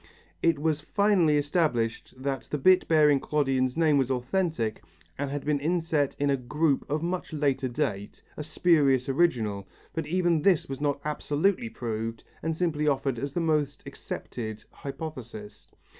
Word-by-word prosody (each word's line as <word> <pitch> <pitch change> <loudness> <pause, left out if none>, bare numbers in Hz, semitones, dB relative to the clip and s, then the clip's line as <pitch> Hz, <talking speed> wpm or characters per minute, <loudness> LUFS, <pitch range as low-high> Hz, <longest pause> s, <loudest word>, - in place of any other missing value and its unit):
It 165 -2 +3
was 155 0 0
finally 185 -4 +3
established 145 -8 0
that 135 0 -3
the 150 - -1
bit 185 +6 +4
bearing 150 -3 +5
Clodion's 135 -3 0
name 155 -4 +4
was 135 -2 +1
authentic 130 - -1 0.3
and 145 0 -3
had 145 0 -4
been 150 -1 +1
inset 160 -2 0
in 140 0 +1
a - - +3
group 145 +3 0
of 150 +2 -1
much 175 -1 -3
later 140 -3 0
date, 120 -6 -3
a - - -5
spurious 150 -4 +3
original, 115 - +1 0.3
but 160 -2 -3
even 175 -1 +2
this 185 -3 +3
was 135 +1 -6
not 145 -1 0
absolutely 160 +9 0
proved 115 - -4 0.2
and 160 0 -1
simply 155 -4 0
offered 135 -3 0
as 140 +2 -4
the 175 - 0
most 150 -3 0
acceptable 110 -3 -6 0.2
hypothesis. 125 -8 -8
145 Hz, 155 wpm, -27 LUFS, 130-160 Hz, 0.3 s, bearing